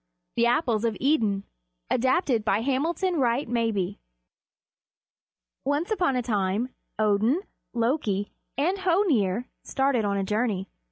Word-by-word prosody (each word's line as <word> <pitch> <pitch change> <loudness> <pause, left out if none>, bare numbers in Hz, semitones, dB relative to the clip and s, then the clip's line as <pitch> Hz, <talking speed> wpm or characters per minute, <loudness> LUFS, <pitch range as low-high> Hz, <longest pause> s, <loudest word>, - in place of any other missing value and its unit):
THE 235 0 +3
APPLES 240 -3 +2
OF 225 -3 0
IDUN 220 -9 +2 0.5
ADAPTED 255 - +2
BY 210 0 +2
HAMILTON 325 +7 0
WRIGHT 245 +2 +1
MABIE 220 -5 0 1.6
Once 290 +8 0
upon 355 -10 +2
a 250 - 0
time 210 +1 0 0.3
Odin, 215 - +2 0.3
Loki, 230 -5 0 0.3
and 355 +8 +1
Hoenir 290 - +2 0.2
started 270 -4 +1
on 200 -1 0
a 195 - 0
journey. 210 -1 0
235 Hz, 115 wpm, -26 LUFS, 210-285 Hz, 1.6 s, THE